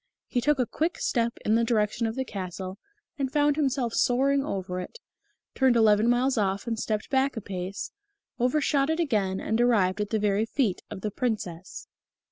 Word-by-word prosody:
He 245 - -1
took 295 +4 +2
a 250 - +2
quick 320 +8 -2
step 235 -1 0
in 215 - +3
the 230 +1 +3
direction 225 0 +1
of 220 - -4
the 265 - -2
castle 185 -2 -6 0.4
and 265 -2 -1
found 290 -1 +3
himself 265 -5 0
soaring 275 +3 +2
over 185 -9 -3
it; 185 - -7 0.6
turned 260 -2 +3
eleven 220 0 +4
miles 250 0 +2
off 195 -1 0
and 230 -2 -2
stepped 215 -1 -2
back 270 -1 +1
a - - -2
pace; 190 0 -5 0.5
overshot 275 +2 +2
it 320 +1 0
again, 205 - 0
and 220 +2 0
arrived 210 -5 +3
at 205 - -2
the 220 - +1
very 210 +1 +1
feet 225 -8 0
of 205 -3 -7
the 210 - -2
Princess. 195 -7 -4
230 Hz, 185 wpm, -27 LUFS, 200-265 Hz, 0.6 s, eleven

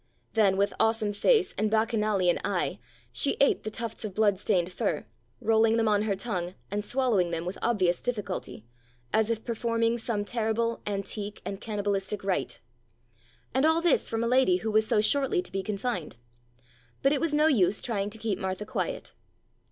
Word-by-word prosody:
Then 200 -4 +3
with 200 +1 +1
awesome 225 -2 +2
face 405 - +3
and 215 +1 +2
Bacchanalian 215 -5 +2
eye 185 - -1 0.3
she 280 - +2
ate 280 - +4
the 215 - -4
tufts 230 +1 -5
of 205 -4 -5
bloodstained 200 -4 +2
fur, - - -2 0.3
rolling 225 0 +3
them 225 -1 +2
on 210 -1 +3
her 210 -2 0
tongue 185 -4 -4 0.2
and 205 +1 -1
swallowing 230 -7 +1
them 165 0 -3
with 180 +2 -5
obvious 185 -7 +1
difficulty, 205 - -4 0.5
as 220 0 +3
if 225 -1 -2
performing 230 0 0
some 215 -3 -2
terrible, 230 +1 -1
antique 205 +1 -4
and 195 +1 -5
cannibalistic 205 -2 -2
rite. 185 -8 -2 0.9
And 265 +2 +2
all 320 +1 +4
this 340 -3 +2
from 225 0 -1
a - - 0
lady 250 -7 +4
who 220 - 0
was 215 0 +3
so 210 - +3
shortly 270 0 +2
to - - -8
be 195 - -2
confined. 200 - -3 0.9
But 275 +1 +4
it 290 - 0
was 330 -2 +1
no 300 +1 +3
use 215 - +3
trying 205 -4 -2
to 215 - -10
keep 215 -3 -2
Martha 190 +1 -3
quiet. - - -4
215 Hz, 175 wpm, -28 LUFS, 195-230 Hz, 0.9 s, ate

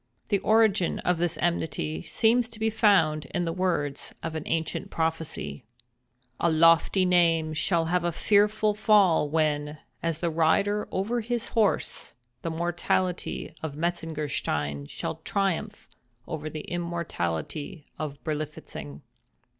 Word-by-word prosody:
The 200 - +2
origin 215 -4 +3
of 180 -2 +1
this 170 -2 0
enmity 140 - -1
seems 230 +1 +2
to 230 -2 -6
be 220 0 +1
found 165 -9 +3
in 175 - +1
the 165 - -1
words 165 -6 -1
of 165 -1 -3
an 160 - -3
ancient 160 -1 -2
prophecy—"A 125 - -4
lofty 165 +3 +4
name 165 -3 +3
shall 165 +1 +1
have 175 +1 +1
a 175 - +1
fearful 210 +4 +3
fall 205 -7 +4
when, 150 -1 0 0.2
as 165 -2 -1
the 170 0 -1
rider 185 +6 +2
over 225 +6 -1
his 235 +1 -2
horse, 215 -3 0 0.3
the 165 - -3
mortality 175 +1 -1
of 155 -3 -4
Metzengerstein 150 - -2
shall - - -4
triumph 200 +1 -1 0.4
over 155 -1 -4
the 155 0 -6
immortality 160 - -4
of 145 -2 -4
Berlifitzing." 150 - -5
165 Hz, 125 wpm, -27 LUFS, 150-190 Hz, 0.4 s, lofty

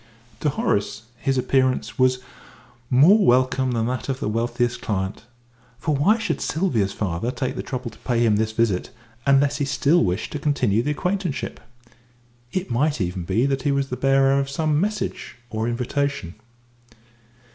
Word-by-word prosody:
To 150 - +1
Horace 105 -5 -1
his 135 +3 0
appearance 130 -3 +1
was 130 0 +4 0.7
more 165 +12 +6
welcome 130 -1 +3
than 115 -1 0
that 125 +2 -3
of 135 -1 -2
the - - -2
wealthiest 120 +2 -1
client 95 +1 -3 0.5
for 145 +5 -1
why 195 +11 +3
should 225 - -2
Sylvia's 130 - 0
father 100 +3 -2
take 130 0 -3
the - - -3
trouble 125 -2 -5
to 105 - -18
pay 120 -2 +1
him 105 -2 +3
this 110 0 0
visit 110 -5 0 0.4
unless 140 +1 +4
he 145 - 0
still 150 +4 +3
wished 90 +2 -2
to 150 - -4
continue 130 -8 +1
the 140 - -2
acquaintanceship? 180 +1 -2 0.9
It 185 -7 -3
might 145 +4 +1
even 90 -2 -2
be 105 +8 +1
that 135 -1 0
he 145 - +1
was 140 -1 0
the 125 - -2
bearer 135 +1 +3
of 135 0 -2
some 150 +1 0
message 210 0 -3 0.2
or 110 +1 -2
invitation. 125 - -2
130 Hz, 165 wpm, -23 LUFS, 115-145 Hz, 0.9 s, more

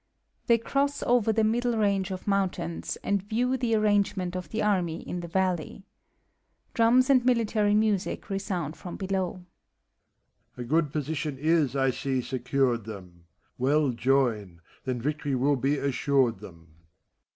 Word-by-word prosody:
[They 235 - +5
cross 280 +5 -1
over 240 -2 +3
the 220 0 +1
middle 235 +2 +1
range 200 -3 +1
of 185 -1 -6
mountains, 190 -4 -1
and 200 -1 0
view 235 +6 0
the 240 -3 0
arrangement 205 -4 +1
of 180 -1 -5
the 220 - -2
army 180 -5 0
in 180 - -4
the 170 - -6
valley. 185 0 -1 0.9
Drums 240 +2 +4
and 255 -3 +5
military 220 -4 +2
music 210 -3 0
resound 190 -6 -3
from 175 - -8
helowJ] 190 -2 -2
MEPHISTOPHELES. - - -20 1.1
A 125 - -4
good 150 +4 +1
position 150 -1 -3
is, 155 -2 +1
I 135 -1 +2
see, 130 +1 -2
secured 125 -2 -1
them; 90 -6 -10 0.3
Well 140 +2 +2
join, 115 -8 0 0.2
then 130 -2 -2
victory 145 +2 -2
will 140 +3 +2
be 140 +3 0
assured 135 -4 +1
them. 85 -5 -14
175 Hz, 145 wpm, -27 LUFS, 135-210 Hz, 1.1 s, They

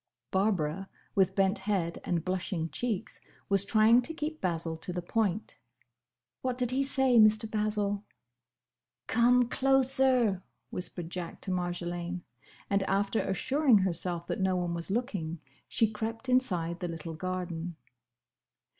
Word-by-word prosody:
Barbara, 190 -2 0 0.2
with 190 -3 +2
bent 195 +1 +3
head 190 -4 -1
and 170 -3 -1
blushing 185 -3 -2
cheeks 230 -6 -3 0.3
was 195 -1 +6
trying 220 +3 +5
to 320 +6 -4
keep 310 0 -4
Basil 165 -2 -1
to 170 - -5
the 180 - -3
point. 210 +1 -1 0.8
"What 255 -1 -2
did 250 -1 +1
he 270 +2 +1
say, 265 -3 +3
Mr. 215 0 +5
Basil?" 210 -1 -1 1.0
"Come 245 +1 +4
closer!" 260 -6 +3 0.3
whispered 175 -2 -5
Jack 175 -2 -5
to 190 - -4
Marjolaine, 175 0 -3 0.4
and 200 0 +2
after 200 +3 +1
assuring 260 - +3
herself 175 -2 0
that - - -3
no 190 -1 +2
one 175 -1 -1
was 170 +1 -2
looking, 195 - -2 0.3
she 225 - +2
crept 225 +3 -4
inside 180 -10 +1
the 180 - -3
little 165 -1 -6
garden. 175 0 -4
195 Hz, 135 wpm, -30 LUFS, 175-230 Hz, 1.0 s, was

